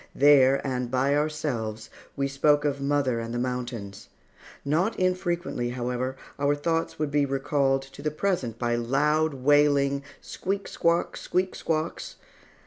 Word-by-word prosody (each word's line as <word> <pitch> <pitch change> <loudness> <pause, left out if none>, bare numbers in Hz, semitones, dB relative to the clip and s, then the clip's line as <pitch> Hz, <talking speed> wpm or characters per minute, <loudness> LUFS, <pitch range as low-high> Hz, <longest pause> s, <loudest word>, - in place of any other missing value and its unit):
There, 140 -1 +5
and 125 -2 -2
by 130 +3 +1
ourselves, 145 -8 -2 0.2
we 140 0 0
spoke 145 +2 +2
of 140 -1 -1
mother 140 -4 +1
and 115 0 -5
the 120 - -3
mountains. 120 -5 -4 0.6
Not 170 +10 +1
infrequently, 175 -8 -1
however, 125 +1 -3 0.2
our 145 +1 +2
thoughts 165 +3 -1
would 150 -2 -2
be 145 0 +3
recalled 135 0 +1
to 135 +1 -12
the 150 - 0
present 150 - -2
by 120 0 0
loud, 150 +5 +1
wailing 140 0 +3 0.2
squeak 195 +1 -4
squawk, 170 +1 0
squeak 185 +1 -1
squawks. 160 0 -3
140 Hz, 135 wpm, -26 LUFS, 125-150 Hz, 0.6 s, There